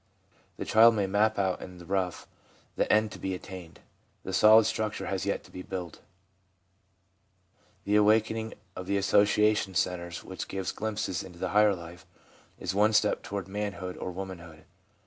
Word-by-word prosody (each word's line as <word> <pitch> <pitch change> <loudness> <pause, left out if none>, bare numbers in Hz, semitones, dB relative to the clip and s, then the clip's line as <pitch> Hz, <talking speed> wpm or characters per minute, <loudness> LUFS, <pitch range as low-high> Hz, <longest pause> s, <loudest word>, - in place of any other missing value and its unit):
The - - -4
child 115 +1 +6
may 100 -2 +1
map 105 +3 +2
out 95 -2 0
in 90 -1 -9
the 85 - -12
rough 95 -1 -2 0.5
the - - 0
end 110 0 +3
to - - -9
be 95 -1 -3
attained; 90 -2 -10 0.4
the 95 - -5
solid 110 +3 +7
structure 110 -1 -2
has 95 0 -3
yet 100 - -1
to - - -18
be 90 - -7
builded. 90 -3 -6 1.8
The 105 +1 +2
awakening 110 +1 +2 0.2
of 90 - -7
the 100 - +1
association 105 0 +3
centres, 85 -1 -2
which 95 - -7
gives 95 -1 -3
glimpses 110 -4 -3
into 90 -2 -11
the - - -3
higher 105 -1 +4
life, 85 0 -11 0.5
is - - -3
one 105 +2 +3
step 105 0 +2
toward 100 -3 -5
man 105 +1 -3
hood 90 -2 -6
or - - -5
womanhood. 85 -4 -8
100 Hz, 165 wpm, -28 LUFS, 90-105 Hz, 1.8 s, solid